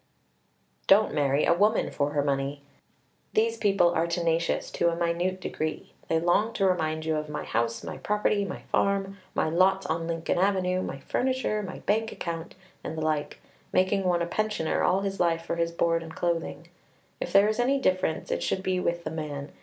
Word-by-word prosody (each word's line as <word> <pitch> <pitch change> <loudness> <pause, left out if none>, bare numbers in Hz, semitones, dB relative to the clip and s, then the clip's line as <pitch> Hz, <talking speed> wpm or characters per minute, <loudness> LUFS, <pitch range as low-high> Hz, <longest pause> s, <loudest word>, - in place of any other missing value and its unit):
Don't 205 +3 +5
marry 140 -1 +2
a - - +5
woman 210 +5 +2
for 145 +1 -1
her 145 - +1
money. 140 0 -1 0.7
These 225 +1 +2
people 195 -5 +3
are 165 0 +1
tenacious 170 -1 0
to 170 - +2
a 165 - -1
minute 175 +2 -1
degree. 155 -3 -4
They 160 - +2
long 190 +7 +2
to 195 - +1
remind 160 -4 0
you 160 -1 +1
of 150 0 -4
my 150 - -4
house, 115 +1 -1
my - - -6
property, 210 0 +1
my 190 -2 -6
farm, 200 0 0 0.2
my - - +1
lots 185 +4 +3
on 165 +1 -2
Lincoln 165 +1 -1
Avenue, 185 -1 +1
my 135 - -4
furniture, 255 - 0
my 185 -2 -7
bank 220 +2 0
account, 170 -1 -5 0.3
and 160 - -5
the - - -2
like 155 -2 -1 0.3
making 190 +2 +2
one 175 -1 +2
a - - 0
pensioner 210 -2 -1
all 185 +2 +2
his 195 0 -3
life 165 -1 +1
for 170 - -2
his 170 0 0
board 170 0 +1
and 160 -1 -9
clothing. 170 -1 -2 0.5
If - - -4
there 200 +1 +6
is 215 +1 -1
any 265 +3 +3
difference, 185 -9 0
it - - -1
should 190 - -1
be 185 -1 0
with 170 -1 -1
the - - -4
man. 150 -3 -5
175 Hz, 195 wpm, -27 LUFS, 160-195 Hz, 0.7 s, there